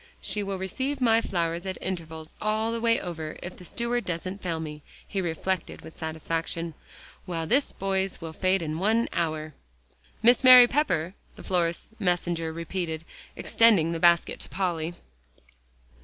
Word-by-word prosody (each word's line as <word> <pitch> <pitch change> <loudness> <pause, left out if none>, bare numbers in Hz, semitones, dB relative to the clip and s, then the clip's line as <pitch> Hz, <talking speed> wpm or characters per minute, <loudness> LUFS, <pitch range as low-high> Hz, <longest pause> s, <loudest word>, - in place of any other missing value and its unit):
"She 210 - -1
will 195 -1 -3
receive 260 +10 -3
my 230 -3 +4
flowers 170 -2 -2
at 190 - -3
intervals 160 -4 -5
all 215 +1 0
the 230 0 -3
way 230 0 +3
over, 160 -3 -6
if 175 - -7
the - - -12
steward 235 +5 -1
doesn't 185 +3 -4
fail 170 -3 -2
me," 150 -1 -6 0.3
he 195 - -2
reflected 175 +1 -2
with 160 - -12
satisfaction, 165 +1 -3 0.5
"while 165 -2 -2
this 270 - +2
boy's 195 0 -1
will 160 -2 -7
fade 185 +1 +1
in 155 +1 -3
an 225 +3 +2
hour." 155 -2 -2 0.7
"Miss 240 +2 +6
Mary 255 -1 +11
Pepper?" 195 - 0 0.2
the - - -11
florist's 170 -3 0
messenger 175 -4 0
repeated, 165 -1 -4 0.3
extending 205 -8 +4
the 165 - -2
basket 170 0 +3
to - - -6
Polly. 175 -3 -2
175 Hz, 155 wpm, -27 LUFS, 165-210 Hz, 0.7 s, Mary